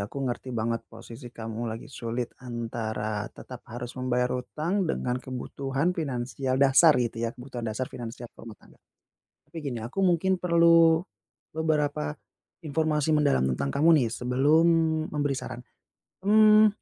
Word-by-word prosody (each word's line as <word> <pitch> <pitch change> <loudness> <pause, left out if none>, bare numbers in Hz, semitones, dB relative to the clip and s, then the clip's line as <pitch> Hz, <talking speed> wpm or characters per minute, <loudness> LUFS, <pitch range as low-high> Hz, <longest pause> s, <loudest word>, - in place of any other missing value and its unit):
aku 140 - -7
ngerti 125 +1 -4
banget 115 +1 -1
posisi 120 +1 -11
kamu 115 -1 -7
lagi 115 +5 -7
sulit 120 -2 -4
antara 110 -3 -4
tetap 125 -2 -11
harus 120 +1 -6
membayar 125 -1 0
utang 170 +10 -2
dengan 125 -5 -1
kebutuhan 135 +5 -2
finansial 130 -3 -2
dasar, 140 +4 +6
gitu 120 -2 -1
ya, - - 0
kebutuhan 125 0 -8
dasar 125 +4 -3
finansial 120 0 -8
ke - - -50
rumah 115 -2 -10
tangga. - - -21 0.7
Tapi - - -16
gini, 135 -5 -4
aku 125 +11 -4
mungkin 185 0 +2
perlu 170 -1 +5 0.5
beberapa 150 - -1 0.5
informasi 155 0 0
mendalam 145 - +3
tentang 70 +2 -2
kamu 165 - +5
nih, 120 - 0
sebelum 130 +8 +2 0.5
memberi 145 -2 0
saran. 125 -1 -6 0.7
Mmm, 215 +1 +7
130 Hz, 140 wpm, -27 LUFS, 120-155 Hz, 0.7 s, Mmm